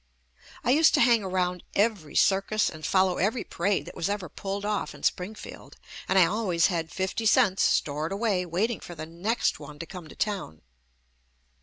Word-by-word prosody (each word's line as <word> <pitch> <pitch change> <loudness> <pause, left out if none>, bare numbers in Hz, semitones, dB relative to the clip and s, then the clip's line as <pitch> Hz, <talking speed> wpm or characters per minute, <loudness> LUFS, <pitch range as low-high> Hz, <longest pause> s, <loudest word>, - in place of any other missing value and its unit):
I 245 - +2
used 310 +4 +5
to - - +2
hang 235 -2 +5
around 180 -1 -1
every 200 -8 0
circus 200 +2 +2
and 155 -2 -11
fol 190 +3 +3
low 185 -1 -1
every 215 +6 0
parade 195 +3 -1
that - - -10
was 170 - -2
ever 200 -4 -3
pulled 200 +5 -5
off 210 -1 -2
in - - -15
Springfield, 195 +4 -4 0.3
and 190 - +3
I 185 - +7
always 185 -3 +1
had 165 -1 -2
fifty 190 +4 -1
cents 210 -4 +4
stored 150 +3 +1
away 200 -2 0
waiting 210 +8 -1
for 175 - -10
the 155 0 -6
next 185 +9 -1
one 145 0 -10
to 165 - -6
come 180 -1 -9
to - - -13
town. 195 - -3
190 Hz, 185 wpm, -27 LUFS, 170-210 Hz, 0.3 s, I